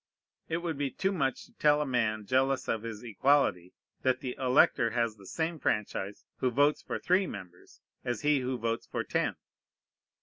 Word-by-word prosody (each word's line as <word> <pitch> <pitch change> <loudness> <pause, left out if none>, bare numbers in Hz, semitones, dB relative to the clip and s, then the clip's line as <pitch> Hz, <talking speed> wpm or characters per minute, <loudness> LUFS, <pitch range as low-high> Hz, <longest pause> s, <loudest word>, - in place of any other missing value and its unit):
It 160 - 0
would 160 -5 -3
be 140 -1 0
too 190 +8 -1
much 140 -9 -1
to 235 - -23
tell 150 0 +4
a 150 - 0
man 110 -5 0
jealous 130 +3 +1
of 115 - 0
his 115 -1 -7
equality, 115 -6 +2 0.3
that 130 0 +2
the 125 -2 -4
elector 125 -2 +4
has 115 -1 0
the 100 -2 -15
same 165 0 -2
franchise 105 -3 -2
who 130 - +1
votes 145 +4 +3
for - - -4
three 185 +1 +2
members 90 - -10 0.2
as 120 -3 -2
he 150 -1 +3
who 130 0 -2
votes 115 0 -2
for - - -2
ten. - - 0
130 Hz, 180 wpm, -30 LUFS, 110-145 Hz, 0.3 s, tell